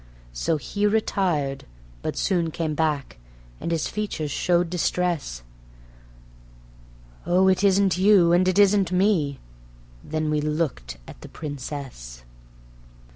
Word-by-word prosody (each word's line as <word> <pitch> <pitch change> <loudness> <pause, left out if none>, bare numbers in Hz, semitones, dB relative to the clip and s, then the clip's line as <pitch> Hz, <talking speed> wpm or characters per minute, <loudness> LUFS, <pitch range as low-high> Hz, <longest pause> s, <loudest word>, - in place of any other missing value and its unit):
So 155 - 0
he 205 +7 -1
retired; 180 -10 0 0.4
but - - -3
he - - -2
soon 170 -3 +1
came 160 -1 -3
back, 150 - -2 0.4
and - - -4
his 165 -2 0
features 200 -8 -3
showed 175 +3 +1
distress: 170 - -1 1.8
"Oh, 180 +2 +3
it 190 0 +2
isn't 195 -1 +3
you 190 -3 +5
and 180 +1 +3
it 185 0 +1
isn't 200 -3 +4
me."... 180 -7 +1 0.7
Then 155 -1 -2
we 150 -1 +1
looked 150 - -2
at - - -12
the - - -10
Princess. 135 - -7
165 Hz, 125 wpm, -24 LUFS, 145-190 Hz, 1.8 s, you